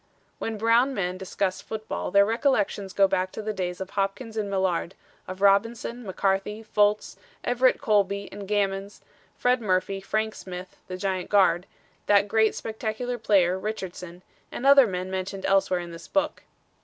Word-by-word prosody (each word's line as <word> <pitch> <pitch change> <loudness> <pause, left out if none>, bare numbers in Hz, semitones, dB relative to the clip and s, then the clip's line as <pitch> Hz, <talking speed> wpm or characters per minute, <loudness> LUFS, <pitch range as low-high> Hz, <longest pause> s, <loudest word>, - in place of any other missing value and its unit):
When 225 -1 -3
Brown 230 +5 +3
men 185 -2 -2
discuss 190 0 -2
football 220 0 -5
their 200 0 +5
recollections 215 -4 0
go 195 0 +4
back 185 0 -1
to - - -5
the 215 0 -2
days 180 -2 -3
of 190 0 -6
Hopkins 205 +4 -2
and 210 -2 -2
Millard, 190 -2 -1 0.3
of 185 +1 -7
Robinson, 230 +4 +2
McCarthy, 195 +2 -1
Fultz, 210 -1 +1 0.3
Everett 250 +1 +3
Colby 200 -1 +1
and 200 0 -8
Gammons, 200 -1 -1 0.4
Fred 250 0 +2
Murphy, 195 -1 0
Frank 215 +2 -1
Smith, 180 0 -8
the 185 - -5
giant 185 -1 -2
guard; 185 -3 +3 0.4
that 205 0 +5
great 220 +1 +2
spectacular 225 +2 -4
player, 190 -4 +3
Richardson, 185 -4 -6 0.3
and 250 - -5
other 275 -2 +8
men 185 -1 -4
mentioned 190 +1 -4
elsewhere 195 -2 +2
in 175 -1 -8
this 165 - -10
book. 295 +1 0
200 Hz, 155 wpm, -26 LUFS, 190-220 Hz, 0.4 s, other